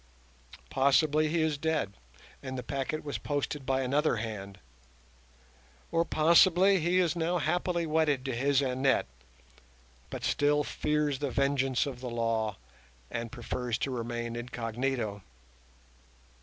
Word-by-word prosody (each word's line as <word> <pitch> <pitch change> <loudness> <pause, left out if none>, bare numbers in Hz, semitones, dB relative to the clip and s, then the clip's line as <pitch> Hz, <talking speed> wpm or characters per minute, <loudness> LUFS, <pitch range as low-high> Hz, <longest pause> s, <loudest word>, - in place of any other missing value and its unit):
Possibly 150 +3 +3
he 160 +1 +1
is 155 -2 0
dead, 160 -10 -1 0.5
and 130 -1 -5
the 125 - -4
packet 140 +4 -3
was 145 -2 -4
posted 145 -1 -3
by 135 0 +1
another 140 +2 +2
hand; 105 -4 -5 1.3
or 165 0 +3
possibly 175 +4 +5
he 175 +3 +1
is 175 -2 +2
now 170 +1 0
happily 175 +1 0
wedded 155 -4 +1
to 130 -3 -2
his 140 +2 +2
Annette, 130 +1 +2 1.0
but - - -6
still 145 0 +2
fears 150 -2 -1
the 145 - -1
vengeance 135 0 +1
of 135 -4 -6
the 125 - -4
law, 115 -3 -1 0.5
and 115 0 -4
prefers 120 -1 -3
to 135 - -2
remain 120 -1 -3
incognito. 120 -2 -3
135 Hz, 130 wpm, -30 LUFS, 120-155 Hz, 1.3 s, possibly